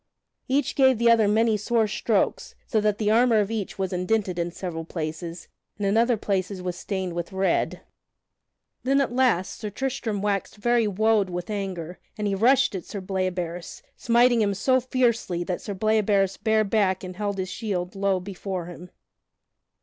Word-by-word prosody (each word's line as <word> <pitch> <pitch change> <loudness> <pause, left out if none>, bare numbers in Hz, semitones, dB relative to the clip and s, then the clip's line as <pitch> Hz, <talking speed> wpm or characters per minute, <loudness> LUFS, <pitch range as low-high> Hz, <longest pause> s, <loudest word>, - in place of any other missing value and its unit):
Each 280 +2 +1
gave 265 -3 +4
the 235 +1 +4
other 225 -2 +4
many 220 +1 +3
sore 225 +1 +1
strokes, 215 - -1
so 220 - +1
that 210 -1 +1
the 210 -1 +1
armor 230 0 +4
of 205 +1 0
each 215 -4 -4
was 190 -1 -2
indented 180 0 0
in 170 0 -1
several 170 -2 -5
places 165 +1 -5 0.3
and 205 - -2
in 200 +1 +2
other 235 +1 +3
places 195 -1 -2
was 180 -1 -4
stained 190 -2 -3
with 175 +2 -4
red. 190 0 0 1.0
Then 275 +2 +2
at 270 -3 0
last 245 -8 +1
Sir 210 - -4
Tristram 225 -2 -3
waxed 200 -2 -1
very 235 +1 +2
wode 210 0 +2
with 180 +3 -5
anger 185 -4 -4 0.2
and 210 - -2
he 200 - 0
rushed 255 +7 +4
at 190 - -4
Sir 205 - -6
Bleoberis, 185 -2 -3
smiting 240 0 +3
him 200 -2 +1
so 255 +6 +3
fiercely 235 -8 0
that 180 0 -3
Sir 200 - -5
Bleoberis 205 -2 +2
bare 220 -1 +2
back 195 -3 +1
and 185 0 -7
held 205 -1 -2
his 185 -1 -3
shield 185 -3 -3
low 195 -1 +1
before 185 -1 -5
him. 175 +1 -10
200 Hz, 175 wpm, -25 LUFS, 185-225 Hz, 1.0 s, gave